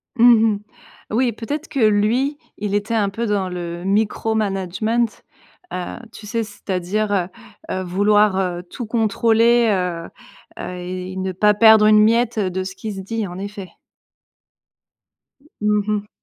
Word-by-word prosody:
Mmh 230 -2 +6
mh. - - -7 0.5
Oui, 240 +2 +2
peut-être 275 +8 -5
que 275 - -4
lui, 230 +6 +2 0.2
il 205 0 -2
était 205 +3 -1
un 205 -3 +2
peu 230 +4 -3
dans 200 -4 0
le 175 -1 -5
micro 215 +2 0
management, 215 +3 -1 0.5
heu, 180 -1 -4 0.2
tu 210 - -11
sais? 230 +1 -1
C'est-à-dire, 205 0 -3
heu, 185 -3 +1 0.5
heu, 185 0 -2
vouloir, 205 +2 +3
heu, 180 -2 -2
tout 205 +7 -7
contrôler, 230 +1 +3
heu, 180 -3 -2 0.5
heu 180 - -5
et 185 +1 -6
ne 190 0 -2
pas 210 +3 +3
perdre 220 0 +7
une 215 0 +6
miette, 230 +1 +2
heu, 195 -3 +1
de 185 +1 -3
ce 190 +1 -7
qui 215 +2 -6
se 195 - -7
dit, 220 +3 -3
en 175 +1 -8
effet. 200 -2 -7 1.9
Mmh 210 -1 +2
mh. 210 0 -1
210 Hz, 155 wpm, -20 LUFS, 190-225 Hz, 1.9 s, perdre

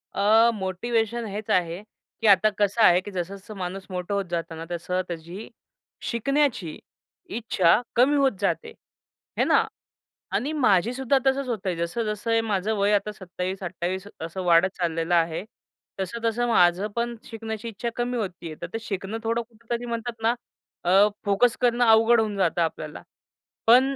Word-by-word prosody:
अ, 220 +3 +5
motivation 225 +4 -1
हेच 205 +1 -6
आहे, 175 +1 +1 0.4
की 225 - +2
आता 200 +1 +6
कसं 205 +3 +2
आहे 180 -2 +6
की 205 - -8
जसं-जसं 195 +4 -6
माणूस 190 +1 -5
मोठं 180 +2 -3
होत 200 -1 0
जात 165 -1 -3
ना, 165 +1 -7
तसं 180 +2 -1
त्याची 170 +4 -7 0.6
शिकण्याची 235 - 0 0.6
इच्छा 215 -2 +3
कमी 265 +5 +4
होत 275 -1 +4
जाते 200 - -1 0.7
हे - - +4
ना. - - +3 0.7
आणि 290 +4 -1
माझी 230 - +3
सुद्धा 265 +1 +2
तसंच 270 0 +2
होत 235 -5 -2
आहे. 185 - 0
जसं-जसं 210 +6 -1
माझं 210 +1 0
वय 200 +1 +2
आता 205 +1 +1
27-28 185 -1 -4
असं 170 +3 -4
वाढत 175 +1 +5
चाललेलं 165 -1 -1
आहे. 165 +1 +1 0.6
तसं-तसं 230 +4 -1
माझं 185 -3 +4
पण 235 0 -1
शिकण्याची 225 0 -6
इच्छा 230 +1 -4
कमी 245 +1 -1
होती 185 -6 -4
आहे, 155 - -7
तर 170 - -4
ते 225 - -2
शिकणं 200 0 -4
थोडं 230 +1 0
कुठंतरी 235 +1 -6
म्हणतात 235 0 -3
ना, 230 - +4 0.5
अ, 195 +4 +5 0.2
फोकस 205 +4 +3
करणं 245 0 +3
अवघड 225 +1 +6
होऊन 215 -2 0
जातं 175 -2 +1
आपल्याला, 155 -2 -3 0.7
पण 260 +4 +6
205 Hz, 155 wpm, -25 LUFS, 180-235 Hz, 0.7 s, आता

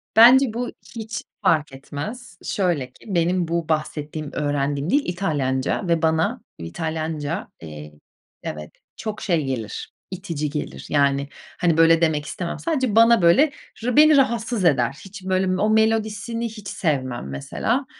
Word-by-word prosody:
Bence 245 +2 +7
bu 245 +1 -3 0.2
hiç 225 0 -5 0.2
fark 155 -3 +2
etmez. 175 - -7
Şöyle 175 -9 0
ki - - -19
benim 175 +1 +1
bu 170 -1 -2
bahsettiğim, 155 -1 -2
öğrendiğim 145 0 -1
dil 285 +8 +4
İtalyanca 150 -3 -1
ve 170 -2 +2
bana 160 0 +1 0.2
İtalyanca, 160 - -3
eee, 75 -1 -9 0.5
evet 75 0 -6 0.3
çok, 215 -1 -5
şey, 170 -7 +1
gelir, 120 -5 -4 0.2
itici 170 -6 -3
gelir. 150 +1 -5
Yani, 140 -1 +2 0.3
hani, 170 -3 +2
böyle 165 0 +5
demek 155 -3 +1
istemem. 170 +3 -4
Sadece 260 -10 0
bana 230 -1 +6
böyle 175 - +5 0.3
r 245 0 0
beni 305 0 +7
rahatsız 235 -5 +1
eder. 135 -5 +3
Hiç 195 0 -10
böyle 190 0 +1
o 215 - +3
melodisini 220 +1 +1
hiç 215 -2 -10
sevmem 130 - -2
mesela. 70 0 -2
170 Hz, 140 wpm, -23 LUFS, 145-215 Hz, 0.5 s, Bence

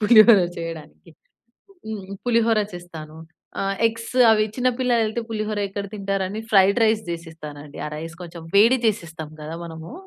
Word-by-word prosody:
పులిహోర 215 -2 +8 0.2
చేయడానికి. 165 0 -8 0.8
హ్మ్, 210 -3 -6 0.2
పులిహోర 230 -2 +3
చేస్తాను. 160 -3 -9 0.4
ఆహ్, 195 0 -1
ఎగ్స్ 230 +1 -4 0.2
అవి 215 -1 +4
చిన్న 255 0 +2
పిల్లలైతే 235 -3 +1
పులిహోర 215 -1 -2
ఎక్కడ 200 0 -5
తింటారని 195 +1 -2
ఫ్రైడ్ 200 +2 +5
రైస్ 220 0 +2
చేసేస్తానండి. 155 -3 -8
ఆ - - -3
రైస్ 165 +2 -7
కొంచెం 170 -1 -9
వేడి 230 +5 +6
చేసిస్తాం 165 -8 -3
కదా! 155 +2 -6
మనము. 160 +5 -9
195 Hz, 135 wpm, -23 LUFS, 165-220 Hz, 0.8 s, పులిహోర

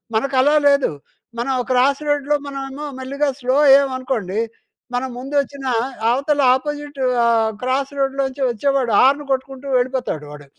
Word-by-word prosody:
మనకలా 275 +5 +2
లేదు. 280 -6 +3 0.5
మనం 255 +3 -1 0.2
క్రాస్ 270 +3 +3
రోడ్‌లో 290 0 +1
మనవేమో 275 +1 -6
మెల్లిగా 280 +3 -1
స్లో 255 0 0
అయ్యాం 275 0 +6
అనుకోండి. 225 -7 -3 0.5
మనం 255 +2 -1
ముందొచ్చిన 280 +1 -2 0.4
అవతల 280 +4 +1
అపోజిట్ 290 +1 -5 0.2
ఆహ్, 230 -1 +3
క్రాస్ 260 +2 -1
రోడ్‌లోంచి 270 0 -1
వచ్చేవాడు 255 +1 0
హార్న్ 280 +3 +4
కొట్టుకుంటూ 265 +1 -3
వెళ్ళిపోతాడు 250 - -2
వాడు. 145 -1 -11
270 Hz, 125 wpm, -20 LUFS, 255-280 Hz, 0.5 s, అయ్యాం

